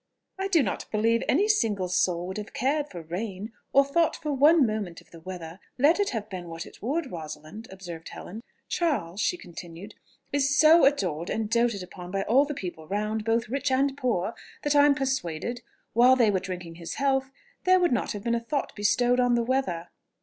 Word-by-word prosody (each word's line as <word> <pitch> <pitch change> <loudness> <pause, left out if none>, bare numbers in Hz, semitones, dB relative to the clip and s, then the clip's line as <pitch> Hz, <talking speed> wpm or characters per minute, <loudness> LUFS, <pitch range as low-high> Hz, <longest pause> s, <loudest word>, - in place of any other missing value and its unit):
"I 385 - 0
do 340 -7 +4
not 200 - -3
believe 230 +2 +2
any 390 +10 +3
single 215 - +1
soul 180 -1 +1
would 190 +2 -5
have 210 0 -7
cared 290 +4 0
for 175 -3 -8
rain, 190 +5 -5 0.2
or 275 0 +5
thought 325 +4 +2
for 300 -2 -3
one 295 +2 +6
moment 210 -6 -3
of - - -22
the 165 - -12
weather, 175 0 -8 0.2
let 295 +8 +4
it 405 - +2
have 220 -3 -4
been 185 -4 -7
what 165 0 -6
it - - -15
would, 280 +4 -2
Rosalind," 160 +6 -8
observed 175 -4 -9
Helen. 215 +5 -8 0.3
"Charles," 215 - -1
she 360 - +1
continued, 175 - -10 0.4
"is 285 +1 +2
so 315 0 +7
adored 180 - +1
and 220 -1 -2
doted 235 -4 +1
upon 180 0 -10
by 195 +1 -1
all 265 +8 +4
the 295 0 -5
people 175 - -7
round, 210 +3 -2
both 230 +1 +1
rich 275 +4 -1
and 270 +1 +2
poor, 235 -7 -1 0.3
that 295 0 +1
I 290 0 +7
am 285 - +4
persuaded, 245 - -2 0.3
while 245 +3 +6
they 235 -5 +4
were 190 - +1
drinking 180 -3 -7
his 170 -1 -6
health, 270 -1 +1 0.4
there 370 0 +6
would 355 -1 +2
not 245 - 0
have 205 -1 -6
been 235 - 0
a 235 - +1
thought 255 +5 -3
bestowed 245 +4 +2
on 245 -1 +3
the 235 - +1
weather." 230 -10 -1
225 Hz, 205 wpm, -27 LUFS, 185-275 Hz, 0.4 s, so